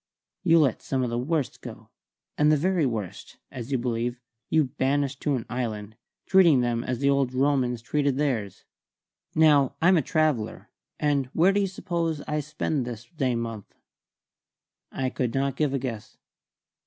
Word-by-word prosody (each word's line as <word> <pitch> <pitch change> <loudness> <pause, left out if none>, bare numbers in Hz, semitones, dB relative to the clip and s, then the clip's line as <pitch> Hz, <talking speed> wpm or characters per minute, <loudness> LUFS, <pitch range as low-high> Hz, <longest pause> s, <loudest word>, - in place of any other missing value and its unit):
"You 165 -3 +5
let 140 -8 +2
some 130 -1 -1
of 120 - -2
the 120 - -1
worst 145 +1 -2
go, - - -10 0.4
and 150 +1 +4
the 155 - +4
very 175 -1 +1
worst 110 -7 -5
(as 125 0 -7
you 135 - +2
believe) 120 0 -2 0.3
you 160 -1 +4
banish 135 +1 0
to 145 -2 0
an 120 - -4
island, 110 -4 -4 0.3
treating 170 -9 +5
them 120 -1 0
as 125 -1 -2
the 140 +2 +1
old 135 -2 +1
Romans 130 -3 +1
treated 140 +1 0
theirs. 120 -10 -2 0.7
Now, 145 -4 +4
I'm 180 +2 +5
a - - +3
traveller; 155 -7 -1 0.3
and 145 -3 +1
where 175 +4 +4
do 205 - +2
you 200 - +1
suppose 170 -4 -2
I 150 +1 -2
spent 150 -1 -2
this 120 -1 -7
day 130 -5 0
month?" 115 -3 -5 1.2
I 130 -1 -2
could 125 -2 -2
not 135 0 0
give 150 -2 +1
a 140 - 0
guess. 120 -5 -6
135 Hz, 165 wpm, -26 LUFS, 120-150 Hz, 1.2 s, You